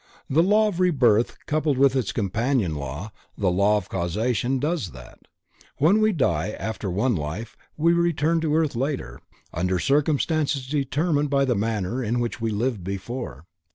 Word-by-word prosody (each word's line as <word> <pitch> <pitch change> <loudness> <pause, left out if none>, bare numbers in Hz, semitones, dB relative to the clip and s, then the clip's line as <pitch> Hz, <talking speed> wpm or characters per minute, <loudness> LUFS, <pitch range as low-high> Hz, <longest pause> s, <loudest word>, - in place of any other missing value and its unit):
The 150 +5 +3
law 210 +4 +4
of 180 -4 -5
Rebirth 125 - +3
coupled 150 -2 0
with 135 0 +4
its 130 -4 0
companion 110 - 0
law, 75 +8 -5 0.3
the 95 -3 +1
law 100 +3 +3
of 100 -3 -5
Causation 110 +8 -1
does 145 - -2
that. 65 -2 -13 0.6
When 185 +9 +4
we 215 0 +4
die 105 - 0
after 110 -3 -4
one 105 +7 +1
life, 85 +9 -5 0.2
we 165 +2 +3
return 170 -1 +1
to 155 -2 +1
earth 160 -5 +1
later, 130 - -3 0.3
under 90 +2 0
circumstances 145 - +1
determined 145 +2 0
by 140 -1 +2
the 125 - +1
manner 110 +2 -1
in 120 +2 0
which 120 0 -3
we 115 - 0
lived 110 -1 -1
before. 100 - -5
125 Hz, 160 wpm, -24 LUFS, 100-150 Hz, 0.6 s, law